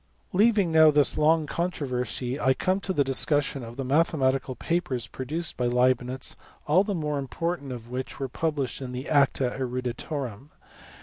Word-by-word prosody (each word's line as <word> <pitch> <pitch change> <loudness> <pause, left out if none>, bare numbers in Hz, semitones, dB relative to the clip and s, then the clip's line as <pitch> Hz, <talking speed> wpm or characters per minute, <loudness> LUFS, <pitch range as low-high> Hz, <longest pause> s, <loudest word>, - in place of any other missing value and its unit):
Leaving 205 -2 +3
now 160 -1 +7
this 145 -2 +3
long 155 +1 +3
controversy 135 -6 -3
I 130 -2 +3
come 185 +6 0
to 195 - -3
the 145 -6 +2
discussion 140 +1 +1
of 115 0 -9
the 135 - -3
mathematical 135 -3 +1
papers 165 -9 -2
produced 145 +9 -4
by 125 - 0
Leibnitz, 125 +1 +1 0.3
all 170 +6 +4
the 205 -1 -2
more 150 -3 -2
important 145 +1 -3
of 120 -1 -8
which 130 +2 -5
were 135 - -2
published 145 -1 -2
in 125 -1 -6
the 130 +3 -5
Acta 140 -3 +2
Eruditorum. 125 0 -4
140 Hz, 160 wpm, -26 LUFS, 125-160 Hz, 0.3 s, now